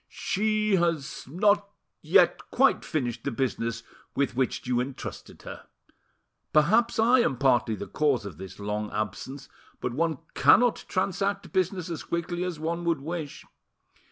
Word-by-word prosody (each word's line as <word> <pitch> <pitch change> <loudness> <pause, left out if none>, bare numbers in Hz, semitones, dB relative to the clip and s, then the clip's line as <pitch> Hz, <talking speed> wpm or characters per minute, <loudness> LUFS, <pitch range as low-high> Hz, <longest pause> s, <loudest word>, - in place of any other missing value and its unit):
"She 215 -1 +2
has 165 -8 -1
not 205 +6 +2 0.3
yet - - +3
quite - - +3
finished 125 -7 -3
the - - -1
business 115 -2 -2 0.3
with 140 -3 0
which 130 0 -1
you 125 -1 +1
entrusted 130 +1 -7
her. - - -9 0.8
Perhaps 215 +10 +3
I 235 +3 +5
am 135 - +1
partly 120 -4 +2
the - - -6
cause 140 -8 0
of 90 -6 -8
this 95 +1 -9
long 105 +1 -3
absence, 120 +6 -4 0.3
but 125 - -3
one 160 +2 0 0.2
cannot 245 -1 +4
transact 195 +1 -1
business 185 -1 0
as 165 - -4
quickly 175 +1 -3
as 180 -4 -4
one 170 +2 -2
would 165 -3 +1
wish. 155 -1 -5
155 Hz, 145 wpm, -27 LUFS, 125-185 Hz, 0.8 s, I